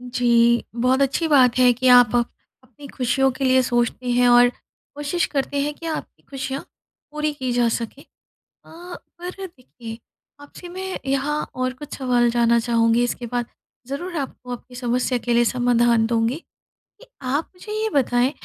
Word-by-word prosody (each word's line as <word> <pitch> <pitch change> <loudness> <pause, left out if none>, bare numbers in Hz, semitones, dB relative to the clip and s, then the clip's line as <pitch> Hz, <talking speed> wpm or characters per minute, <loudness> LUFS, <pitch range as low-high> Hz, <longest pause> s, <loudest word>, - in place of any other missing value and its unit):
जी। 235 -1 +3
बहुत 255 +3 +2
अच्छी 275 +4 +1
बात 260 -5 +4
है 250 -1 +6
कि 255 +2 -1
आप 245 -1 +2
अपनी 245 +4 -6
खुशियों 270 +1 +1
के 260 - -6
लिए 260 0 +4
सोचते 240 0 -1
हैं 245 0 +3
और 245 0 +6 0.5
कोशिश 295 +4 -1
करते 280 0 -1
हैं 295 +1 -2
कि 330 - -12
आपकी 320 -1 -6
खुशियाँ 270 0 -4 0.5
पूरी 300 0 -2
की 260 -3 -3
जा 240 -1 +2
सकें। 230 +4 -4 0.6
अ, 350 +2 -10 0.2
पर 365 +2 -6
देखिए 245 -8 -11 0.4
आपसे 290 +5 -12
मैं 375 +1 -5
यहाँ 275 +2 -1
और 255 0 -1
कुछ 280 +3 -9
सवाल 245 -3 +2
जानना 235 0 +3
चाहूँगी 230 0 +2
इसके 245 0 -3
बाद 240 0 -2 0.4
ज़रूर 345 +7 -5
आपको 260 -3 -6
आपकी 245 +1 -11
समस्या 250 +1 0
के 240 0 -2
लिए 240 0 +4
समाधान 240 -2 +2
दूँगी, 230 +1 0 0.6
कि - - -15 0.2
आप 280 +4 -2
मुझे 390 +4 -10
ये 440 - 0
बताएँ 250 -1 +2
255 Hz, 165 wpm, -22 LUFS, 240-285 Hz, 0.6 s, है